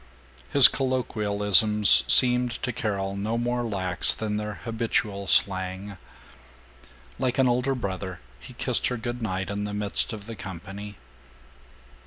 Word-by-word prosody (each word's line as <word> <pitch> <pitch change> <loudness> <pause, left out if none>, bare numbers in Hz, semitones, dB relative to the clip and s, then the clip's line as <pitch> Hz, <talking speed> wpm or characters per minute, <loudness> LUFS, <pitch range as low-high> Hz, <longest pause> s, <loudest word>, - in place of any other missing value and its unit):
His 140 -4 +8
colloquialisms 105 -5 +3
seemed 125 -1 +6
to 125 - -2
Carol 100 -3 -3
no 105 +4 -3
more 120 +1 -2
lax 95 -5 -2
than 105 -1 -4
their 105 0 -5
habitual 110 -3 -3
slang. 95 +1 0 1.2
Like 130 -2 -2
an 130 -1 +3
older 125 +2 0
brother 95 -5 -6 0.2
he - - -13
kissed - - -1
her 125 - -3
good 120 +1 -6
night 95 -2 -4
in 100 0 -4
the 105 0 -5
midst 105 +3 -1
of 105 -3 -9
the 115 0 -8
company. 95 +2 -9
105 Hz, 135 wpm, -25 LUFS, 100-120 Hz, 1.2 s, His